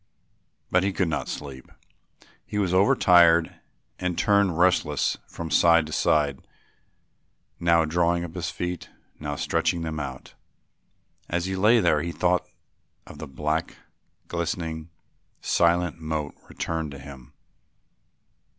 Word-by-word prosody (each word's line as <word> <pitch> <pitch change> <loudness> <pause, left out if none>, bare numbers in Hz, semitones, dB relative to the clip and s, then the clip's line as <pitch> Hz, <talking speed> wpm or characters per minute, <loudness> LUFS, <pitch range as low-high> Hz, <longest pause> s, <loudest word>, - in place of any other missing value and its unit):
But 90 - +4
he 100 +2 0
could 95 -3 0
not 75 - -2
sleep. 70 -3 -8 0.7
He 105 - -6
was 95 -3 0
overtired 85 -3 +5 0.5
and 90 -1 -2
turned 100 -5 +2
restlessly 90 +1 +1
from 85 -1 -7
side 85 -2 +5
to 80 - -9
side, 70 -3 +1 1.2
now 85 -1 +3
drawing 85 +2 +1
up 85 -2 -7
his 85 -4 -3
feet, 90 +2 -5 0.3
now 75 -1 -4
stretching 85 +3 0
them 80 -1 -4
out. 65 -3 -7 1.0
As 85 +1 -1
he 95 0 -2
lay 110 +5 +4
there 80 -5 +3
the 85 - -3
thought 90 0 0 0.6
of - - -12
the - - -6
black, 75 +4 -2 0.5
glistening, 85 -1 -4 0.5
silent 85 -1 +1
moat 80 -2 -3 0.2
returned 80 -2 -3
to - - -8
him. 70 -2 -12
85 Hz, 125 wpm, -25 LUFS, 80-90 Hz, 1.2 s, overtired